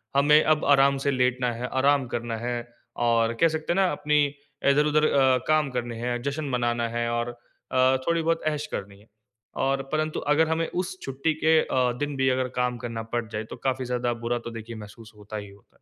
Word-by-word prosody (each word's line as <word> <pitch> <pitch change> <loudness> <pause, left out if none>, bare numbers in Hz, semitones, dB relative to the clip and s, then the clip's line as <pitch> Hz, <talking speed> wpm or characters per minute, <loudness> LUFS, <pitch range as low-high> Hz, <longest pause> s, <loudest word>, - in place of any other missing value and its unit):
हमें 150 +2 +5
अब 155 - -3
आराम 140 -1 +5
से 140 - +3
लेटना 125 -1 +1
है 120 +2 -4
आराम 135 +1 +2
करना 120 -1 -3
है 120 +2 -3 0.5
और 115 -1 +2
कह 165 - +7
सकते 160 +1 -2
हैं - - -3
ना 190 -2 +3
अपनी 150 0 +2 0.5
इधर-उधर 150 +2 +3
अ, 130 -2 +4
काम 155 -2 +3
करने 120 -2 -3
है 120 0 -2
जश्न 140 +2 -2
मनाना 120 -1 0
है 120 0 -1
और 120 0 -1 0.4
अ, 130 0 +4
थोड़ी 170 0 +2
बहुत 165 0 0
ऐश 150 -1 -1
करनी 100 0 -6
है। 105 - -21 0.6
और 135 0 +1
परंतु 155 0 -1
अगर 150 +2 +2
हमें 160 0 0
उस 180 +1 -3
छुट्टी 135 +4 -1
के 160 0 +5
अ, 125 -1 +1
दिन 145 -1 -2
भी 135 -1 +2
अगर 130 0 +1
काम 125 0 0
करना 115 -2 -5
पड़ 120 -1 0
जाए 110 -1 -4
तो - - -5
काफ़ी 130 -1 0
ज़्यादा 125 -1 -1
बुरा 120 +1 0
तो - - -5
देखिए 115 0 -8
महसूस 110 +1 -11
होता 105 +1 -8
ही 100 -1 -7
होता 100 0 -20
है। - - -45
130 Hz, 215 wpm, -26 LUFS, 120-150 Hz, 0.6 s, कह